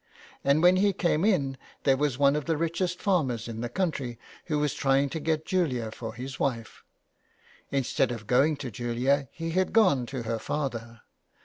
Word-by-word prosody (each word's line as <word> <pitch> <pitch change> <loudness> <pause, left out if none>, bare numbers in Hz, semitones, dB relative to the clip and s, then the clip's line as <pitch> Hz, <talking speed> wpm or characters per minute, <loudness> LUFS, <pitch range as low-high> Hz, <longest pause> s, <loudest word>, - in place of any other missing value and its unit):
And 140 +4 +3
when 180 +1 +6
he 200 +1 +3
came 170 -3 +1
in 140 -11 +1 0.2
there 135 -2 +4
was 140 -2 0
one 140 0 +4
of 150 - -2
the 165 -2 0
richest 170 +3 -1
farmers 135 - 0
in 115 -1 -5
the 120 - -3
country 140 -10 -2 0.3
who 155 -3 -1
was 150 -2 0
trying 135 +1 +2
to 160 - -4
get 155 0 -1
Julia 130 - 0
for 115 0 -7
his 130 +2 -7
wife. 115 -5 -3 0.9
Instead 135 -2 +1
of 115 -3 -6
going 135 +7 +3
to 130 -4 -6
Julia, 125 +4 0
he 165 0 -4
had 185 +2 0
gone 140 - +4
to 130 -2 -5
the 115 0 -2
father. 115 -6 -4
140 Hz, 185 wpm, -27 LUFS, 120-160 Hz, 0.9 s, when